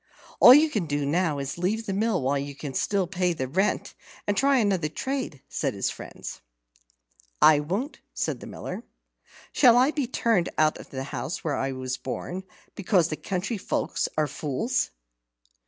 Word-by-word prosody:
"All 250 Hz, -, +11 dB
you 305 Hz, +1 st, +5 dB
can 200 Hz, -, -1 dB
do 145 Hz, -1 st, -1 dB
now 155 Hz, 0 st, +1 dB
is 140 Hz, 0 st, -3 dB
to 175 Hz, -, -9 dB
leave 220 Hz, +5 st, 0 dB
the 195 Hz, -, -2 dB
mill 205 Hz, -, +1 dB
while 140 Hz, +2 st, +1 dB
you 140 Hz, 0 st, -5 dB
can 140 Hz, -1 st, -6 dB, 0.4 s
pay 180 Hz, -1 st, +1 dB
the 130 Hz, -5 st, -3 dB
rent, 190 Hz, +10 st, 0 dB, 0.3 s
and 205 Hz, -, 0 dB
try 275 Hz, +5 st, +4 dB
another 195 Hz, -9 st, +1 dB
trade," 260 Hz, -, -4 dB
said -, -, -2 dB
his -, -, -1 dB
friends. -, -, -8 dB, 1.0 s
"I 155 Hz, -1 st, +7 dB
won't," 195 Hz, -, -3 dB
said -, -, -2 dB
the -, -, -9 dB
Miller. -, -, -6 dB, 0.7 s
"Shall 245 Hz, -4 st, +6 dB
I 260 Hz, +4 st, +5 dB
be 290 Hz, -5 st, -1 dB
turned 230 Hz, -8 st, +1 dB
out 155 Hz, 0 st, +3 dB
of -, -, -11 dB
the 130 Hz, -1 st, -5 dB
house 135 Hz, +3 st, -5 dB
where 155 Hz, -3 st, -1 dB
I 135 Hz, 0 st, -1 dB
was 130 Hz, -1 st, -3 dB
born, 180 Hz, +8 st, -5 dB, 0.3 s
because 185 Hz, -4 st, +2 dB
the 155 Hz, -, -2 dB
country 195 Hz, +6 st, -3 dB
folk -, -, -2 dB, 0.2 s
are 155 Hz, -, +3 dB
fools?" 150 Hz, -, -1 dB
180 Hz, 175 wpm, -26 LUFS, 145-225 Hz, 1.0 s, All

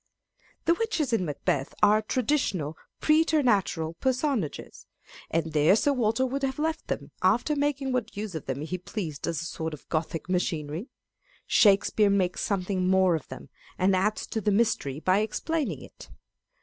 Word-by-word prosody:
The 335 Hz, -, +5 dB
witches 345 Hz, -, -1 dB
in 185 Hz, -5 st, +2 dB
Macbeth 145 Hz, -2 st, -2 dB
are 215 Hz, +1 st, +6 dB
traditional, 215 Hz, -, -1 dB, 0.3 s
preternatural 250 Hz, -, +2 dB
personages; 260 Hz, -, -2 dB, 0.4 s
and 160 Hz, -1 st, -1 dB
there 155 Hz, +5 st, +5 dB
Sir 285 Hz, +6 st, +2 dB
Walter 235 Hz, 0 st, +1 dB
would 270 Hz, +2 st, -2 dB
have 270 Hz, -1 st, -1 dB
left 315 Hz, +1 st, -2 dB
them -, -, -4 dB
after 240 Hz, +10 st, +2 dB
making 285 Hz, -2 st, 0 dB
what 240 Hz, -5 st, -2 dB
use 210 Hz, -2 st, -4 dB
of 160 Hz, -, -6 dB
them 135 Hz, +1 st, -3 dB
he 180 Hz, +4 st, -4 dB
pleased 170 Hz, -5 st, -5 dB
as 170 Hz, -1 st, -2 dB
a -, -, -6 dB
sort 160 Hz, -2 st, -4 dB
of 145 Hz, -, -21 dB
Gothic 160 Hz, +1 st, -2 dB
machinery. 170 Hz, -, -2 dB, 0.6 s
Shakespeare 205 Hz, 0 st, +4 dB
makes 190 Hz, -3 st, +1 dB
something 185 Hz, -2 st, -1 dB
more 190 Hz, -1 st, +4 dB
of 160 Hz, -4 st, -3 dB
them, -, -, -10 dB, 0.3 s
and 190 Hz, +1 st, +3 dB
adds 210 Hz, +3 st, 0 dB
to 220 Hz, -, -3 dB
the 210 Hz, -, +1 dB
mystery 195 Hz, -, +1 dB
by 185 Hz, +4 st, +3 dB
explaining 220 Hz, -, -2 dB
it. -, -, -14 dB
200 Hz, 160 wpm, -27 LUFS, 165-255 Hz, 0.6 s, are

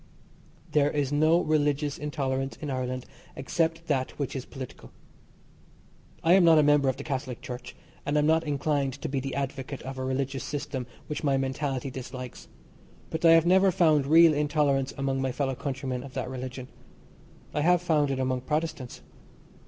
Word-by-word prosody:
There 145 Hz, -1 st, +3 dB
is 145 Hz, -2 st, -1 dB
no 155 Hz, +4 st, +4 dB
religious 150 Hz, -2 st, 0 dB
intolerance 135 Hz, -2 st, -2 dB
in 150 Hz, -2 st, -5 dB
Ireland 130 Hz, -1 st, -3 dB, 0.3 s
except 165 Hz, +4 st, -1 dB
that 135 Hz, -5 st, -1 dB
which 140 Hz, -2 st, -3 dB
is 130 Hz, -, -4 dB
political. 130 Hz, -2 st, -9 dB, 1.3 s
I 165 Hz, -, +5 dB
am 190 Hz, -1 st, +6 dB
not 165 Hz, -2 st, +7 dB
a 155 Hz, -, +6 dB
member 145 Hz, -2 st, +4 dB
of 130 Hz, -, -2 dB
the 140 Hz, -, -6 dB
Catholic 130 Hz, -4 st, -4 dB
Church, 125 Hz, 0 st, -8 dB, 0.3 s
and 145 Hz, +1 st, 0 dB
am 150 Hz, -, +3 dB
not 160 Hz, +1 st, +3 dB
inclined 145 Hz, -2 st, 0 dB
to -, -, -1 dB
be 140 Hz, -2 st, -1 dB
the 135 Hz, 0 st, -4 dB
advocate 135 Hz, -1 st, -4 dB
of 130 Hz, +1 st, -6 dB
a -, -, -2 dB
religious 135 Hz, +1 st, -2 dB
system 140 Hz, -4 st, -4 dB, 0.2 s
which 150 Hz, +2 st, -5 dB
my 140 Hz, -2 st, +2 dB
mentality 135 Hz, 0 st, -2 dB
dislikes, 125 Hz, -1 st, -8 dB, 0.6 s
but 160 Hz, +1 st, -3 dB
I 165 Hz, -1 st, +8 dB
have 165 Hz, 0 st, +5 dB
never 190 Hz, +2 st, +5 dB
found 160 Hz, -6 st, +3 dB
real 165 Hz, +1 st, +7 dB
intolerance 145 Hz, -2 st, +1 dB
among 135 Hz, -1 st, -1 dB
my 135 Hz, -1 st, 0 dB
fellow 135 Hz, +1 st, -1 dB
countrymen 130 Hz, -1 st, -4 dB
of 135 Hz, -1 st, -11 dB
that 130 Hz, -1 st, -3 dB
religion. 130 Hz, 0 st, -6 dB, 0.9 s
I 150 Hz, -, 0 dB
have 180 Hz, +3 st, +4 dB
found 155 Hz, -4 st, +2 dB
it 135 Hz, -, -1 dB
among 130 Hz, -1 st, -1 dB
Protestants. 150 Hz, -3 st, -3 dB
140 Hz, 175 wpm, -27 LUFS, 130-150 Hz, 1.3 s, I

